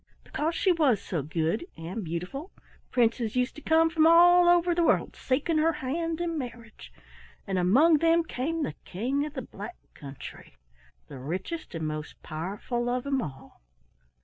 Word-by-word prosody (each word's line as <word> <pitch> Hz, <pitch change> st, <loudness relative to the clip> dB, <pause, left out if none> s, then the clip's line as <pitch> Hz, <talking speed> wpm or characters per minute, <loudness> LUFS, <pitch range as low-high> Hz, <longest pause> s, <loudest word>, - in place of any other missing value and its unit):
"Because 320 Hz, +3 st, -2 dB
she 380 Hz, -, +3 dB
was 295 Hz, -, +3 dB
so 170 Hz, -5 st, -3 dB
good 160 Hz, -, -2 dB
and 180 Hz, +7 st, -5 dB
beautiful 180 Hz, -, -5 dB, 0.4 s
princes 235 Hz, -2 st, +1 dB
used 250 Hz, 0 st, +1 dB
to -, -, -9 dB
come 320 Hz, +1 st, +4 dB
from 320 Hz, -1 st, +4 dB
all 350 Hz, +1 st, +7 dB
over 350 Hz, 0 st, +4 dB
the 345 Hz, -, +1 dB
world -, -, +2 dB
seeking 300 Hz, +5 st, 0 dB
her 325 Hz, +2 st, +3 dB
hand 320 Hz, +3 st, -3 dB
in 335 Hz, -2 st, -2 dB
marriage, 235 Hz, -3 st, -9 dB, 0.5 s
and 190 Hz, -2 st, -1 dB
among 285 Hz, -, +5 dB
them 330 Hz, +1 st, +4 dB
came 320 Hz, +2 st, -2 dB
the -, -, -3 dB
King 265 Hz, +10 st, -2 dB
of 300 Hz, -, -11 dB
the -, -, -4 dB
Black 360 Hz, -, -9 dB, 0.2 s
Country, 135 Hz, -, -10 dB, 0.5 s
the 130 Hz, -, -9 dB
richest 185 Hz, -, -5 dB
and 160 Hz, -1 st, -3 dB
most 155 Hz, 0 st, -6 dB
powerful 200 Hz, +9 st, -3 dB
of 250 Hz, 0 st, -1 dB
them 275 Hz, -2 st, 0 dB
all. 135 Hz, -, -9 dB
260 Hz, 165 wpm, -28 LUFS, -, 0.5 s, all